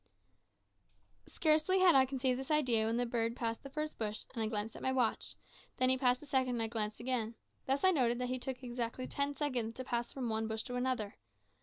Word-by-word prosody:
Scarcely 315 +4 +2
had 370 -2 +7
I 265 -1 +6
conceived 255 -1 0
this 265 - -6
idea 250 -8 +3
when 230 +1 0
the 245 - +1
bird 230 -1 -1
passed 230 -2 -2
the 275 - -9
first 305 +2 -4
bush, 215 -1 -3
and 235 - -3
I 220 - +1
glanced 215 0 -3
at - - -9
my 260 - +1
watch; 250 -4 0 0.4
then 255 -1 +3
he 260 - +4
passed 250 -1 +3
the - - -10
second, 260 -3 +1
and 230 - 0
I - - 0
glanced 215 -2 -2
again. 235 -2 -1 0.3
Thus 270 +4 +1
I 375 - +7
noted 245 -7 +2
that 250 0 -2
he 255 0 -1
took 260 +1 -4
exactly 240 0 -3
ten 280 +2 -1
seconds 250 -6 -1
to 260 - -5
pass 240 -2 -2
from 260 -3 -3
one 220 0 -1
bush 220 0 -2
to 250 - -6
the 250 +1 0
other. 215 -5 -3
250 Hz, 230 wpm, -34 LUFS, 230-265 Hz, 0.4 s, had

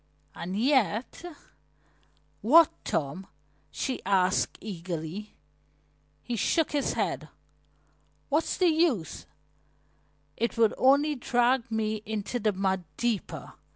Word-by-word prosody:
And 185 +3 -5
yet 255 - +1 0.6
" - - -38
"What, 310 +8 +7
Tom?" 155 +7 -2 0.4
she 260 - -3
asked 190 -1 +1
eagerly. 180 0 -6 0.9
He 240 - -3
shook 315 - +1
his 290 -2 0
head. - - -2 1.0
"What's 305 +3 0
the 365 -2 +4
use? 310 - 0 1.1
It 235 +1 -1
would 225 -2 +4
only 280 +3 +4
drag 245 -1 +1
me 220 -1 -1
into 220 +2 -3
the 215 -1 +2
mud 190 -1 -1
deeper. 235 -4 -2
220 Hz, 105 wpm, -28 LUFS, 195-265 Hz, 1.1 s, What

